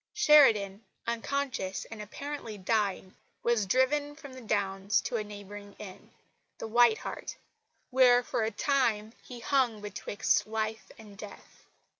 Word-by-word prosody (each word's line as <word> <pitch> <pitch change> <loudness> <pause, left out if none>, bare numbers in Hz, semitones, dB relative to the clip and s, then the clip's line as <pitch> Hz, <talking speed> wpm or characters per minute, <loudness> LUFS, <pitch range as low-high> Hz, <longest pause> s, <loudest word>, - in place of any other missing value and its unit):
Sheridan, 230 - +5 0.2
unconscious 235 -4 -2
and 220 -1 -7
apparently 235 0 -6
dying, 195 -2 -1 0.3
was 235 -4 +1
driven 285 +6 +1
from 285 -3 -11
the 260 - -10
Downs 200 -1 0
to 235 - -2
a 215 - -2
neighbouring 205 -1 -10
inn, 190 -3 -11 0.5
"The - - -6
White 235 0 +5
Hart," - - -7 0.5
where 250 -1 +5
for - - -2
a 220 - +1
time 225 -3 0
he 245 -2 -10
hung 250 -5 +1
betwixt 205 0 -1
life 220 0 -3
and 210 -2 -13
death. 205 0 -13
220 Hz, 135 wpm, -29 LUFS, 205-255 Hz, 0.5 s, Sheridan